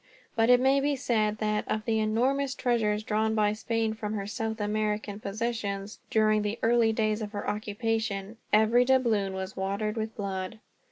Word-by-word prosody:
But 225 +1 +3
it 250 0 +7
may 265 +2 +4
be 285 +1 +1
said 215 -5 0
that, 210 -1 0
of 215 0 -1
the 220 -1 +1
enormous 260 +6 +1
treasures 220 -5 +1
drawn 220 +1 0
by 210 -1 +2
Spain 225 0 -1
from 215 -1 -4
her 200 -2 -3
South 220 +1 -3
American 210 0 -1
possessions, 210 -1 -3
during 215 -1 +3
the 210 +2 -2
early 230 -1 +4
days 215 -1 0
of 210 0 -5
her 205 - -4
occupation, 210 0 -2
every 220 +3 +5
doubloon 235 -7 +2
was 190 +1 -5
watered 200 +3 -2
with 220 0 -3
blood. 195 0 -4
215 Hz, 170 wpm, -28 LUFS, 210-230 Hz, -, it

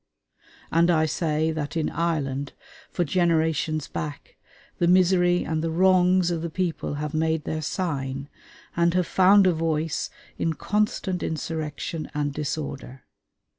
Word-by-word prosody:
And 170 +1 +4
I 160 -2 +3
say 155 0 0
that 155 0 -3
in 160 - 0
Ireland, 145 -5 -2 0.4
for 175 - -1
generations 160 -2 +1
back, 150 -1 -6 0.4
the 175 - +3
misery 180 0 +4
and 160 0 -1
the 165 - 0
wrongs 180 +1 +4
of 165 -2 -2
the 170 - -3
people 170 -3 -2
have 150 +1 -4
made 160 0 0
their 155 +1 -3
sign, 140 -5 -3 0.5
and 170 +1 +2
have 180 -1 +2
found 190 +3 +5
a 180 - +4
voice 160 -1 -1 0.3
in 165 - 0
constant 195 0 -1
insurrection 160 0 -4
and 145 -1 -1
disorder. 140 -3 -5
160 Hz, 135 wpm, -25 LUFS, 150-175 Hz, 0.5 s, found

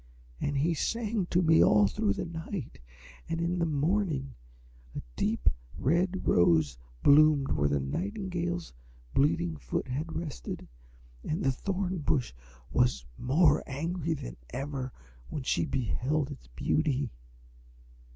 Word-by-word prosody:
And 145 -1 -1
he 160 +5 +2
sang 215 +2 -1
to 180 +1 +2
me 160 0 +6
all 105 -1 +6
through 100 0 +1
the - - -3
night, 160 - -6 0.5
and 165 0 -1
in 175 +1 0
the 170 - +2
morning 155 -2 0 0.6
a - - -3
deep, - - -1 0.3
red 175 +7 +1
Rose 80 -6 +4 0.3
bloomed 145 -1 +6
where 70 0 +2
the 70 0 +1
nightingale's 175 - -3 0.4
bleeding 85 - +2
foot 60 -4 -3
had 150 +6 -3
rested, 165 -5 -5 0.6
and 155 - -2
the 135 - +3
Thorn 185 +5 -2
Bush 135 - 0 0.4
was 125 - +2
more 150 +4 +4
angry 165 +3 -2
than - - -7
ever 135 0 -4 0.4
when 145 - -4
she - - +1
beheld 135 - -1
its 135 - -10
beauty. 140 - 0
150 Hz, 130 wpm, -30 LUFS, 125-170 Hz, 0.6 s, me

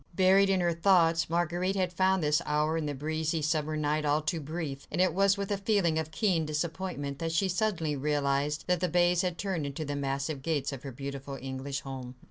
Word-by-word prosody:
Buried 190 +2 +5
in 190 -1 +2
her 175 -1 +2
thoughts, 165 -2 +3
Marguerite 175 +3 0
had 185 -2 0
found 190 0 +2
this 150 0 +2
hour 150 +1 +1
in 160 -2 -1
the 145 - -3
breezy 155 +2 -2
summer 155 0 0
night 150 0 0
all 150 0 +2
too 160 +1 -1
brief; 150 -2 -5
and - - -2
it 185 -2 +3
was 195 +2 +3
with 200 0 -3
a 200 - +1
feeling 195 -6 +2
of 160 -1 -3
keen 175 -1 +1
disappointment, 155 -2 -3
that 165 -1 -2
she 165 +4 +2
suddenly 180 -5 0
realised 145 +1 0
that 180 -1 +1
the 180 0 0
bays 175 +1 +3
had 180 -2 -2
turned 190 -6 -2
into 140 +3 -4
the 145 0 -3
massive 140 +1 -2
gates 145 -2 -1
of 135 - -7
her 135 - -7
beautiful 140 +1 -6
English 135 +1 -4
home. 130 -2 -7
160 Hz, 215 wpm, -29 LUFS, 145-180 Hz, -, Buried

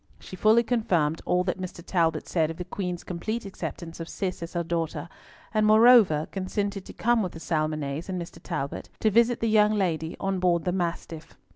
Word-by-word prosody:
She - - -10
fully 215 +5 +4
confirmed 180 -10 +1
all 180 0 +2
that 185 0 -2
Mr. 175 -2 -7
Talbot 165 -3 0
said 160 -3 +1
of 165 - -6
the 180 - -5
Queen's 180 -1 -4
complete 215 +6 -4
acceptance 170 -3 -7
of 165 - -6
Cis 185 -3 -3
as 170 - -6
her 175 -1 -1
daughter, 165 -2 -3 0.5
and 215 -1 +2
moreover 215 -7 +6
consented 195 +1 -3
to - - -10
come 240 0 +2
with 185 -4 -3
the 165 - -8
Salmonnets 155 -1 -2
and 185 -1 -2
Mr. 170 0 -8
Talbot, 145 -5 -4
to 215 - +2
visit 235 +3 +3
the 230 - +1
young 215 0 +4
lady 165 -5 -1
on 195 -1 -1
board 175 -2 +2
the 180 - +1
Mastiff. 170 -3 -4
180 Hz, 195 wpm, -26 LUFS, 165-210 Hz, 0.5 s, moreover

